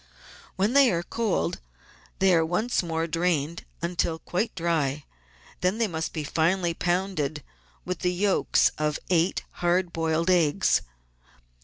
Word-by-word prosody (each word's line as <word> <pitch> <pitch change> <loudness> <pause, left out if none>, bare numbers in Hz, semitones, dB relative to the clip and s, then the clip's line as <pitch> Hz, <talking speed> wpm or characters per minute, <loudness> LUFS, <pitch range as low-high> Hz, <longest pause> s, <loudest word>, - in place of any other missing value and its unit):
When 200 +5 +1
they 275 -2 +6
are 170 -1 -1
cold 225 +1 -1 0.6
they 190 -1 +4
are 165 -1 +4
once 180 +9 0
more 165 -2 -2
drained 165 -1 -1 0.2
until 170 -1 0
quite 180 +7 -3
dry; 155 -5 -1 0.5
then 185 +4 +1
they 230 - +2
must 160 -3 -3
be 155 - -4
finely 170 +4 +1
pounded 175 -5 -1 0.4
with 180 -2 -3
the 180 - +1
yolks 190 +2 +2
of 150 -1 0
eight 170 +1 +2
hard 175 0 +1
boiled 165 +2 +1
eggs. 165 -5 +3
170 Hz, 135 wpm, -26 LUFS, 160-185 Hz, 0.6 s, they